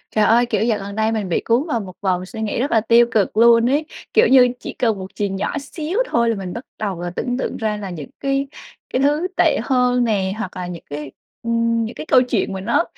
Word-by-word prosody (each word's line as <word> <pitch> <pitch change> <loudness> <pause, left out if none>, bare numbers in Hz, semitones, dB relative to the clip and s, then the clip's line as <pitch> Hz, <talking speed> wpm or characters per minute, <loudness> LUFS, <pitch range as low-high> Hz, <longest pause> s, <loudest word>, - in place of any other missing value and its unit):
Trời 215 - +4
ơi, 235 +2 +4
kiểu, 215 -3 0
dạo 225 -3 +1
gần 200 +1 -7
đây 220 0 +1
mình 215 -4 -2
bị 170 - 0
cuốn 245 +8 +1
vào 240 -6 0
một 185 -3 -8
vòng 185 -2 0
suy 220 +3 -8
nghĩ 220 +1 -2
rất 275 - -1
là 225 - +4
tiêu 235 +2 +5
cực 210 -1 +1
luôn 235 +1 +6
ấy. 295 +3 +1 0.3
Kiểu 445 - +5
như, 255 -1 +7
chỉ - - -7
cần 225 -5 +1
một 190 - -6
chuyện 200 -2 -2
nhỏ 200 +8 -2
xíu 315 - -4
thôi 235 - +1
là 230 - +1
mình 190 -3 -6
bắt 235 - -7
đầu 195 -5 -3
là 175 - -3
tưởng 245 0 -2
tượng 265 - -3
ra 215 -1 -1
là 200 -2 -6
những 160 -6 -7
cái 275 0 -1 0.5
cái 255 - +1
thứ 295 +5 +2
tệ - - +3
hơn 250 -2 +2
nè, 195 -5 0
hoặc 190 -4 -5
là 180 -1 -4
những 175 -2 -8
cái, 145 -1 -6 0.3
ừm, 230 0 +1
những 220 - -7
cái - - -7
câu 260 -5 +5
chuyện 240 -6 -1
mà 190 - -5
nó 195 - +2
225 Hz, 260 wpm, -20 LUFS, 195-250 Hz, 0.5 s, như